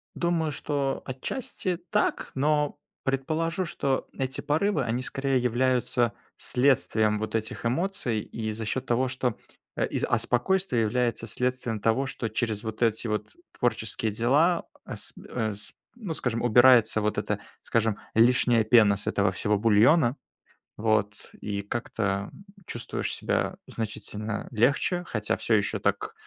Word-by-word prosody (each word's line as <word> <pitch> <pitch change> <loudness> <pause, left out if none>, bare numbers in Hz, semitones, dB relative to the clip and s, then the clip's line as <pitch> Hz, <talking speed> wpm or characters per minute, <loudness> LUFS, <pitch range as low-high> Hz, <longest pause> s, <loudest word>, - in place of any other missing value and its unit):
Думаю, 170 -3 0
что 140 -2 -2
отчасти 180 - -3
так, 210 0 0
но 150 +1 +1 0.3
предположу, 160 +7 -1
что 135 -4 -1
эти 135 0 -3
порывы- 155 +1 +1
они 120 +1 -1
скорее 135 0 0
являются 125 -1 +1 0.2
следствием 115 -5 +2
вот 110 +1 -3
этих 110 +1 -3
эмоций, 130 - 0
и 110 +1 -5
за 110 +1 -5
счет 130 +4 -2
того, 125 +2 +1
что, 125 -2 -1 0.4
а - - +1
и, - - -3
а, - - +2
спокойствие 125 +1 +1
является 115 0 0
следствием 125 -1 -1
того, 115 +6 +2
что 120 - -3
через 110 -1 -1
вот 110 0 -6
эти 115 0 +1
вот 105 - -3 0.2
творческие 110 -2 -1
дела, 145 - +3 0.2
а - - -7
с - - -6 0.2
э, 110 -3 -1
с 100 +1 -6 0.2
ну, 210 -9 -5
скажем, 120 -6 -2
убирается 120 -2 +6
вот 105 0 0
эта, 105 0 -1 0.2
скажем, 110 -2 +1 0.2
лишняя 120 0 +4
пена 110 -2 +5
с 100 - -7
этого - - +2
всего 105 0 +1
бульона. 120 +6 +5 0.6
Вот. 105 -1 +1 0.3
И 100 -1 -3
как-то, 115 +4 -4 0.3
м, 195 - -15 0.2
чувствуешь 120 - -3
себя - - -1
значительно 105 -1 -5
легче, 140 - +2
хотя 105 -7 -1
всё 115 - 0
еще 105 0 +2
так, 100 0 -1
120 Hz, 145 wpm, -27 LUFS, 110-135 Hz, 0.6 s, убирается